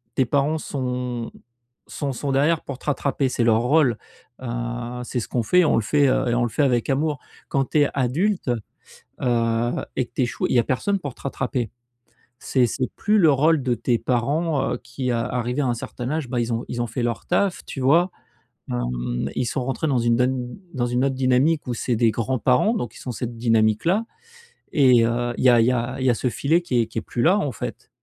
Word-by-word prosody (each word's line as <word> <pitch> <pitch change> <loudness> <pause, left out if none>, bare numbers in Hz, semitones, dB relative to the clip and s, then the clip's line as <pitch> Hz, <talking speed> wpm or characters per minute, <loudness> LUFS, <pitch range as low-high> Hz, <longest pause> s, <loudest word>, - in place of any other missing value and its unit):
tes 130 - +3
parents 140 +5 +1
sont 125 -5 -3 0.6
sont 140 -3 -3
sont 140 +3 -3
derrière 150 +4 +2
pour 135 -2 -7
te - - -16
rattraper, 140 -2 0
c'est 125 - 0
leur 115 -1 +4
rôle, 125 -2 +3 0.4
heu, 130 - -6 0.6
c'est 125 +1 -3
ce 115 - -5
qu'on 120 - -1
fait, 180 +10 +4
on - - +3
le 115 - +2
fait 145 +6 +3
et 130 -2 +2
on 120 - +1
le 120 - 0
fait 145 - 0
avec 125 -3 +1
amour. 145 +1 0 0.3
Quand 135 -1 +1
tu 155 - +2
es 145 - +3
adulte, 145 - 0 0.7
heu 115 -1 +1 0.3
et 130 - +1
que - - -28
tu - - 0
échoues, 120 - -1
il - - 0
y - - +6
a - - +3
personne 165 - 0
pour 145 -8 -6
te - - -17
rattraper». 125 -4 -2 0.8
C'est 130 -2 +3
c'est 130 +2 -2
plus 210 +1 +2
le 165 -5 +6
rôle 150 +1 +3
de 125 -1 +1
tes 120 +1 0
parents, 135 +6 0
heu, - - -2
qui, 125 0 -3
heu, - - +1
arrivés 125 +3 -1
à - - 0
un 120 - +1
certain 120 +1 -6
âge, 155 -3 -2
bah, 125 -1 -1
ils 120 0 -2
ont 115 - -2
ils 120 - -2
ont 120 - -1
fait 115 +3 -4
leur 120 -1 -2
taf, 185 +1 0
tu - - -7
vois? 165 +8 +4 0.6
Hem, - - -2
ils 125 - 0
sont 130 +2 -2
rentrés 135 +4 -2
dans 135 -4 +2
une 115 0 +2
don 125 +3 -1 0.2
dans 120 -2 0
une 125 +1 0
autre 135 -1 0
dynamique, 130 +4 +2
où 125 - -1
c'est 120 +1 -1
des 115 -1 +3
grands-parents, 125 - +1
donc 120 - -3
ils - - -11
sont 125 - -5
cette 120 0 -5
dynamique-là 115 - +2 0.7
et 130 -5 +5
heu, 120 +1 -1
il - - -1
y - - +8
a 120 -2 +6
il - - +4
y - - +4
a 125 +2 -2
il 130 - -1
y - - +4
a - - 0
ce 125 - -1
filet 155 +8 +1
qui 125 -9 +1
est - - 0
qui 115 - -4
est - - -7
plus 120 +4 -3
là, 190 +5 +4
en 145 -9 -1
fait. - - -7
125 Hz, 235 wpm, -23 LUFS, 120-145 Hz, 0.8 s, y